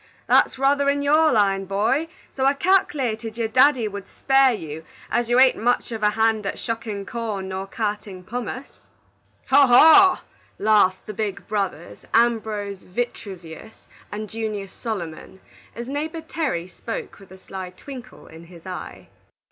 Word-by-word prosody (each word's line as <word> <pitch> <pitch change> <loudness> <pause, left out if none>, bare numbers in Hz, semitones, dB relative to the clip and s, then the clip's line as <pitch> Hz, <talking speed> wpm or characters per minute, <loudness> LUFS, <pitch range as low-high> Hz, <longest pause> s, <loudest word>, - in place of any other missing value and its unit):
That's - - +3
ruther 280 +1 +2
in 285 0 0
your 310 +2 +4
line, 195 -3 +2
boy, 210 - 0 0.3
so 265 - -1
I 275 +1 +4
calk'lated 265 - 0
your 230 -1 0
daddy 255 0 +4
would 200 -1 -7
spare 270 -1 +3
you, 160 -7 -6 0.3
as 240 -1 0
you 240 +1 +4
ain't 260 -1 +5
much 245 +1 0
of 225 -1 -5
a 210 - +4
hand 220 0 +1
at - - -2
shuckin' 220 -3 -4
corn 210 -5 -4
nor 190 +1 -4
cartin' 205 -3 -4
pummace." 245 +6 -6 0.7
"Haw! 275 +1 +6
haw!" 320 +10 +7 0.4
laughed 205 -3 +3
the 215 - -6
big 200 -2 -4
brothers, 195 - -3 0.2
Ambrose 220 -4 +1
Vitruvius 190 -3 -7 0.3
and 215 +1 -5
Junius 215 -3 -5
Solomon, 190 -4 -6 0.4
as 235 +2 -6
neighbor 310 +4 -4
Terry 300 - -3
spoke 225 +5 -7
with 195 - -16
a 190 - -13
sly 190 -1 -8
twinkle 250 +6 -11
in 165 +1 -13
his 170 0 -15
eye. 185 -1 -8
220 Hz, 150 wpm, -23 LUFS, 195-260 Hz, 0.7 s, haw